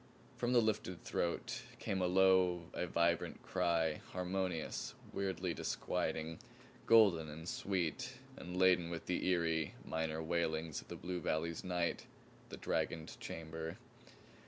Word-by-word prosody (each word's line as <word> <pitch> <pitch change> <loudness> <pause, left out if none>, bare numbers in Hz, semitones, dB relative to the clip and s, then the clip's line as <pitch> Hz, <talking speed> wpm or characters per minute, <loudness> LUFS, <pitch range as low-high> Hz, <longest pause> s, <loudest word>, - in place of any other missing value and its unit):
From 120 0 0
the 120 -2 +6
lifted 105 -5 -1
throat 85 +7 -1 0.2
came 95 -5 -1
a 90 - +3
low, 90 -2 +4
a 90 - -1
vibrant 85 0 +1
cry; 85 -4 +1
harmonious, 90 -2 -2 0.2
weirdly 95 -3 -1
disquieting, 80 0 -2 0.5
golden 95 -9 +6
and 80 +3 -8
sweet 95 +6 -1 0.2
and 90 +1 -6
laden 90 -2 +5
with 85 -1 -5
the 90 - 0
eery, 80 -4 +1
minor 80 0 -1
wailings 80 -2 0
of - - -18
the - - -6
blue 90 +1 -3
valley's 80 +2 -1
night, 90 -2 -1 0.4
the - - -7
dragoned 80 -1 -1
chamber. 80 0 -5
85 Hz, 130 wpm, -37 LUFS, 80-95 Hz, 0.5 s, the